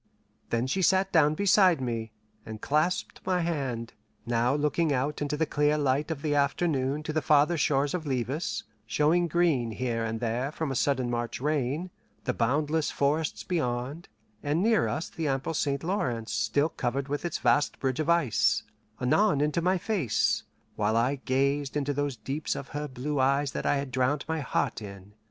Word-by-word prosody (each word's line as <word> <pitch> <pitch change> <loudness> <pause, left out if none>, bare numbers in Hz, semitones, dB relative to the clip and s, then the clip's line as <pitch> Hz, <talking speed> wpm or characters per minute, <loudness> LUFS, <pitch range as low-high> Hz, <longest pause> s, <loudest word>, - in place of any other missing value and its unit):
Then 115 +1 0
she 135 +9 -1
sat 190 +1 +3
down 155 -2 +4
beside 190 -2 +4
me, 115 -3 -3 0.3
and 110 -1 -8
clasped 155 +9 0
my 185 -1 +1
hand, 135 -9 -2 0.3
now 120 +2 +1
looking 150 +2 +1
out 140 +3 -1
into 145 0 -1
the 160 - +2
clear 150 0 +1
light 145 +1 +1
of 155 -2 -4
afternoon 145 -1 +1
to 155 - -4
the 155 - +1
farther 150 +3 +4
shores 145 -2 +1
of 170 -4 -3
Levis, 135 +5 -2 0.2
showing 160 +8 +2
green 160 -8 +2
here 115 +1 -2
and 115 0 -2
there 120 +4 -1
from 160 -2 -3
a - - -2
sudden 130 -1 +1
March 120 -1 -3
rain, 150 +4 -1 0.3
the 125 - -1
boundless 150 +7 +1
forests 150 +2 0
beyond, 140 -1 -2 0.3
and 150 +5 0
near 225 0 +3
us 160 - -2
the 160 -2 -4
ample 135 +3 -1
St. 140 -2 -1
Lawrence 125 - -2
still 145 +3 +1
covered 135 +1 -2
with 145 +1 -3
its 175 -2 -2
vast 145 - +2
bridge 130 0 -1
of 155 +1 -1
ice; 150 -11 +3 0.4
anon 150 +6 +3
into 150 +3 +1
my 185 +2 +2
face, 175 - +1 0.3
while 110 +2 +1
I 125 +5 +2
gazed 140 +2 +1
into 145 0 -1
those 145 -2 -2
deeps 135 +7 -3
of 140 - -7
her 150 0 -4
blue 135 +2 -3
eyes 140 +1 +2
that - - -3
I - - +3
had 140 -1 -3
drowned 130 +3 0
my 160 0 -1
heart 130 -4 -1
in. 100 -1 -10
145 Hz, 180 wpm, -28 LUFS, 125-155 Hz, 0.4 s, down